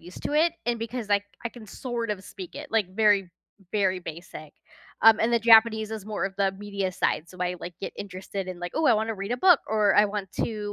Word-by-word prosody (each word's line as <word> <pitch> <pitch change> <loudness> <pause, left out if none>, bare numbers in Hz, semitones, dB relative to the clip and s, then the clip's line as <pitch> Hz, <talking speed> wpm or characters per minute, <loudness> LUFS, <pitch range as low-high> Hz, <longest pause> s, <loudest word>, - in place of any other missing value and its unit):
used 175 +2 -12
to - - -3
it, 320 +3 +3
and 240 -1 0
because, 230 0 -5
like, 205 0 +2 0.2
I 235 - -2
can 230 -3 -12
sort 235 +1 -4
of 195 -2 -4
speak 185 -2 -10
it, - - -8
like, 220 -4 +1
very, 205 -4 +3 0.4
very 190 -3 +1
basic. 165 -3 -9 0.5
Um, 225 -1 +8
and 225 - +2
the 235 - +4
Japanese 220 -1 +5
is 215 -2 -6
more 215 -2 -2
of 195 0 -3
the 195 -1 +1
media 200 -1 -3
side. 170 -2 -1
So 185 - -14
I, 180 0 -1
like, 175 - -7
get - - -5
interested 190 0 -6
in, 180 -1 -6
like, 175 0 -6
"Ooh, 315 0 +1
I - - +6
wanna 220 +1 -1
read 200 +3 -4
a - - 0
book," 355 +3 +5
or 210 -2 +2
"I 210 +1 +6
want 200 -2 -5
to 210 -2 -3
205 Hz, 240 wpm, -26 LUFS, 190-225 Hz, 0.5 s, Um